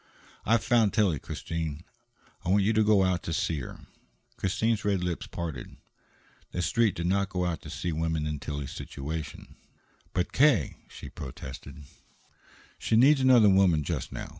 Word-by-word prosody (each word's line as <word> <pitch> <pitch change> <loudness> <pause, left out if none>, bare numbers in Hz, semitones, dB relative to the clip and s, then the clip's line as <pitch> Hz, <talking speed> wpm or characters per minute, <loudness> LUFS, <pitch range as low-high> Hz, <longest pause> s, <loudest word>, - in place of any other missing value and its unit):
"I've 115 -3 +3
found 115 -1 +3
Tillie, 95 - +2
Christine. 80 +1 -5 0.6
I - - -3
want 100 +1 +4
you 110 +3 +2
to 110 0 +3
go 105 -2 +4
out 90 -1 +1
to - - -5
see 80 -1 -1
her." 65 - -8 0.5
Christine's 110 +3 0
red 100 -3 0
lips 90 -2 -3
parted. 80 -8 -6 0.7
The 90 - -2
Street 115 +3 +2
did 85 - -3
not 95 +2 +1
go 90 -1 -1
out 85 -3 -2
to - - -10
see 85 - -3
women 80 -1 -1
in 75 -1 -3
Tillie's 70 -2 -5
situation. 75 +2 -7 0.5
"But, 90 - -2
K.!" 130 - +3
she - - -10
protested. 65 +2 -9 1.0
"She - - 0
needs 135 +4 +6
another 125 -4 +6
woman 95 -5 +4
just - - -3
now. - - -6
90 Hz, 165 wpm, -28 LUFS, 80-105 Hz, 1.0 s, needs